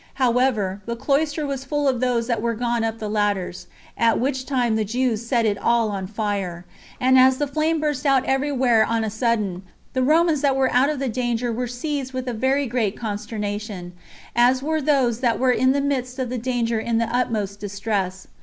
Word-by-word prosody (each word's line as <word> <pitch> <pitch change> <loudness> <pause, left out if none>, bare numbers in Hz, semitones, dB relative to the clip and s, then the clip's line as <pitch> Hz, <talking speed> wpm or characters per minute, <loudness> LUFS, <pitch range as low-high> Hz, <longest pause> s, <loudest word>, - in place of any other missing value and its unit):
However, 240 -6 +1
the 235 - -2
cloister 295 +4 0
was 275 -2 -3
full 290 +1 -1
of 255 -3 +1
those 245 -2 +1
that 235 -3 -1
were 230 0 -1
gone 235 0 -1
up 225 0 -2
the 215 - -5
ladders; 200 -4 -1 0.3
at 230 -1 +2
which 260 0 -1
time 245 -5 +1
the 220 - +1
Jews 235 +1 -1
set 235 -1 +1
it 205 -2 0
all 235 -2 +2
on 190 -2 -4
fire; 200 -4 -3 0.3
and 260 +1 +5
as 260 0 +5
the 290 - 0
flame 310 +3 0
burst 295 -3 -1
out 270 -3 +3
every 270 +2 0
where 245 -5 +3
on 225 +1 0
the 220 - -2
sudden, 215 -5 -1 0.3
the 260 - 0
Romans 310 +2 +3
that 280 -2 +2
were 265 -1 +1
out 255 +3 +4
of 305 - -1
the 270 0 -2
danger 240 0 -1
were 245 +2 -2
seized 265 +2 -4
with 255 0 -4
a 245 - -1
very 265 +5 +1
great 230 -5 -1
consternation, 210 -3 -5 0.4
as 250 +2 +4
were 315 +1 0
those 265 -5 +2
that 240 -3 +1
were 260 -1 +3
in 260 +1 +3
the 280 +1 +1
midst 255 -2 -2
of 260 -2 -2
the 255 - -2
danger 235 -2 -1
in 230 +1 -1
the 230 - +2
utmost 210 -5 -1
distress. 200 -2 -3
240 Hz, 210 wpm, -22 LUFS, 220-265 Hz, 0.4 s, and